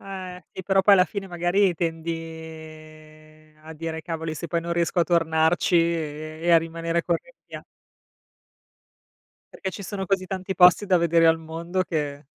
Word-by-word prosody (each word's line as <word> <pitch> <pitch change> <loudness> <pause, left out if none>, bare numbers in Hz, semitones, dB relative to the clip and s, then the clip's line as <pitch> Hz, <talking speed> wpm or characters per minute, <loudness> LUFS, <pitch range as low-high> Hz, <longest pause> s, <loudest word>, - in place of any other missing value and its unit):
Eh, 185 -2 -8
e 190 - -7
però 195 +1 +3
poi 200 +1 +6
alla 180 -2 +5
fine 195 0 -6
magari 175 +2 +1
tendi 165 0 -3
ehm, 155 -1 -12
a 160 - -9
dire 160 0 -5
"cavoli 160 -2 -4
se 170 - -6
poi 170 - 0
non 170 +1 -4
riesco 170 +1 0
a - - +3
tornarci 165 +1 +2
e 155 -2 -1
e 175 - +1
a 165 - +8
rimanere 165 +1 -3
col 170 -1 +1
rimpia" - - -13 1.9
Perché 190 - -4
ci 200 - -8
sono 195 0 -5
così 190 0 0
tanti 190 +1 -4
posti 180 +3 +6
da 185 -2 +4
vedere 170 -1 +3
al 165 0 +5
mondo 165 +3 -3
che 150 -4 -4
165 Hz, 170 wpm, -24 LUFS, 160-180 Hz, 1.9 s, a